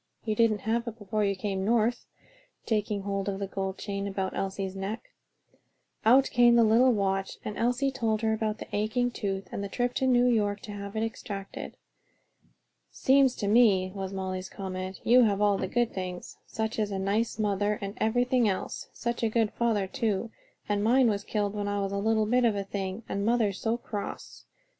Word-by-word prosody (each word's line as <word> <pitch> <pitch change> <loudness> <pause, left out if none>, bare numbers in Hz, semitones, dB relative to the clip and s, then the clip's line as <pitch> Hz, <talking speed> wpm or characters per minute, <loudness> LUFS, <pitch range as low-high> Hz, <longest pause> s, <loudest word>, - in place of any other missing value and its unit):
You 215 - 0
didn't 215 -2 +2
have 230 +2 -1
it 230 -1 -5
before 210 0 -2
you 200 -1 +1
came 190 0 -2
North," 230 +2 +1 0.6
taking 210 -2 -1
hold 195 0 -2
of 195 - -3
the 200 - -3
gold 190 0 -4
chain 200 -1 -4
about 190 -1 -3
Elsie's 195 0 -3
neck. 210 - -5 0.9
Out 260 +5 +5
came 240 -1 +5
the 235 - +6
little 235 +4 +5
watch 195 -3 -1
and 210 - -4
Elsie 245 +4 +1
told 225 -4 -1
about 220 -1 0
the - - -8
aching 245 +4 0
tooth 195 -4 -3
and 200 - -4
the 200 - -4
trip 245 +3 -1
to 260 - 0
New 245 -1 +4
York 210 -4 +2
to 220 - -8
have 200 0 -7
it 220 - 0
extracted. 200 -3 -6 1.1
"Seems 265 -1 +3
to 205 - -3
me," 200 -4 +4
was 195 -1 -4
Molly's 190 -1 -4
comment, 185 -1 -5
"you 250 +2 +6
have 200 -2 +1
all 205 -1 +3
the - - -1
good 240 +4 0
things: 180 -2 -5
such 220 0 -3
a 205 -2 -1
nice 205 +4 0
mother 205 -1 0
and 200 0 -5
everything 245 +1 +2
else. 190 - -4
Such 240 0 -3
a 230 - +2
good 220 -1 +1
father 225 -4 +1
too, 215 +2 -2 0.4
and 205 -1 0
mine 245 +2 +4
was 200 -1 -3
killed 205 -1 -1
when 205 -1 -3
I 205 0 -1
was 195 -1 -2
a 200 - -2
little 220 +1 +2
bit 250 +3 +2
of 225 -3 +3
a 200 - -2
thing; 195 +2 -4
and 200 - -2
mother's 220 -3 +1
so 225 +1 0
cross. 210 -4 -7
210 Hz, 195 wpm, -28 LUFS, 195-230 Hz, 1.1 s, the